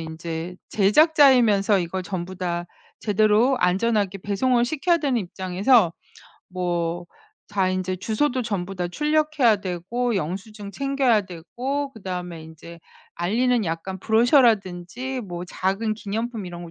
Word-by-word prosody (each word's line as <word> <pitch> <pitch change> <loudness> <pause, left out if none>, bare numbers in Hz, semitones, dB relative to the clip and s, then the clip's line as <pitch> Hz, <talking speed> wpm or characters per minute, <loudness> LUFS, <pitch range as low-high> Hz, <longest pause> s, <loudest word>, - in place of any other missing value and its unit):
인제 165 +2 -6 0.2
제작자이면서 225 - +4
이걸 185 +2 -3
전부 185 -1 -5
다 175 -2 -2 0.4
제대로 215 +5 +3
안전하게 195 +1 +1
배송을 240 +5 +1
시켜야 335 +6 +1
되는 275 -5 0
입장에서 185 +2 +2 0.6
뭐 175 -1 -2 0.4
다 195 -2 +1
인제 185 0 -2
주소도 250 +6 -1
전부 195 -4 -3
다 180 -1 -3
출력해야 300 - +2
되고 200 +7 -2
영수증 200 +4 -5
챙겨야 275 -5 +2
되고 255 - -4
그다음에 180 -5 -6
인제 160 +1 -12 0.3
알리는 230 +6 +1
약간 170 +3 -4
브로셔라든지 230 - +2
뭐 175 0 -5
작은 195 +5 -1
기념품 220 +1 -4
이런 175 -1 -8
거 165 - -10
200 Hz, 295 characters per minute, -23 LUFS, 180-245 Hz, 0.6 s, 제작자이면서